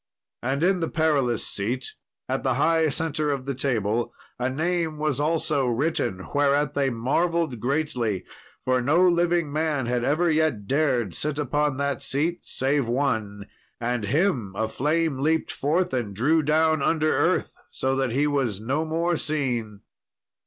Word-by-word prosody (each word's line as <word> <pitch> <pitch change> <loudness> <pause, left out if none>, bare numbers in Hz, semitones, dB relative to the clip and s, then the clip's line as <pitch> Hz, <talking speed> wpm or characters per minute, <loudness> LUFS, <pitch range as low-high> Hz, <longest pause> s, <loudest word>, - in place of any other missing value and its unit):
And 135 +5 -1
in 185 +1 +3
the 165 - -1
Perilous 145 -8 +1
Seat, 120 +6 -3 0.3
at - - -1
the - - 0
high 160 -1 +3
centre 155 0 -1
of 135 -3 -2
the 140 - -2
table, 120 -3 -1 0.3
a 125 +1 0
name 160 +2 -1
was 150 -3 -1
also 150 -3 +1
written, 120 - -1
whereat 145 0 +2
they 140 -1 +1
marvelled 140 +3 0
greatly, 125 - -1 0.4
for 130 0 +2
no 165 +8 +4
living 170 -3 +2
man 155 -4 0
had 120 0 -1
ever 160 +6 +2
yet 155 -10 +1
dared 130 - +1
sit 150 -1 -2
upon 145 0 0
that 140 -1 -1
seat, 150 +6 0
save 135 -1 0
one, 110 -6 -1 0.3
and 120 -2 -1
him 125 - 0
a 110 +2 0
flame 150 +4 0
leaped 160 +3 +1
forth 175 +6 0
and 115 -6 -2
drew 155 +10 +3
down 155 +1 +2
under 155 +1 +2
earth, - - +1 0.2
so 130 0 -1
that 135 -2 0
he 140 +5 +1
was 135 -9 0
no 135 +8 -1
more 165 +2 0
seen. 125 -10 -2
140 Hz, 155 wpm, -25 LUFS, 125-160 Hz, 0.4 s, no